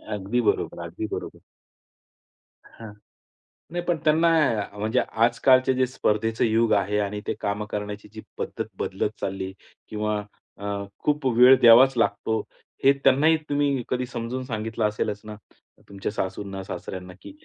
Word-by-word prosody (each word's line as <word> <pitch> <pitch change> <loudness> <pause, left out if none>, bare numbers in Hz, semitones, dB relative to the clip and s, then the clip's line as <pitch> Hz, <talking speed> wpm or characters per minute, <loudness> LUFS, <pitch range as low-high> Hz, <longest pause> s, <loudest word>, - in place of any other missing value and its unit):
अगदी 105 +5 -1
बरोबर, 110 - 0
अगदी 90 +6 -5
बरोबर. - - -6 1.3
हां. 110 -2 -12 0.8
नाही, 175 0 -3
पण 175 -2 +1
त्यांना 160 +2 +4 0.3
अ, 100 0 -9
म्हणजे 110 +2 0
आजकालचे 130 +3 +3
जे 130 0 +2
स्पर्धेचं 110 -2 0
युग 115 0 +2
आहे 100 0 +1
आणि 105 0 -2
ते - - 0
कामं 100 +1 -2
करण्याची 105 0 -5
जी 110 - -8 0.2
पद्धत - - -4
बदलत 95 +2 -1
चालली 95 -1 -3 0.4
किंवा 105 0 -1 0.4
अ, 100 - -8 0.3
खूप 150 -1 -1
वेळ 125 +2 +8
द्यावाच 120 +3 +8
लागतो, 110 -1 0 0.4
हे 135 - +7
त्यांनाही 155 +4 +5
तुम्ही 145 -3 +1
कधी 125 0 -1
समजून 120 +1 -5
सांगितलं 110 -2 -2
असेलच 105 -1 -3
ना? 105 0 -7 0.5
तुमच्या 100 0 -4
सासूंना-सासऱ्यांना 95 -2 -5
की - - -10
110 Hz, 140 wpm, -25 LUFS, 105-130 Hz, 1.3 s, वेळ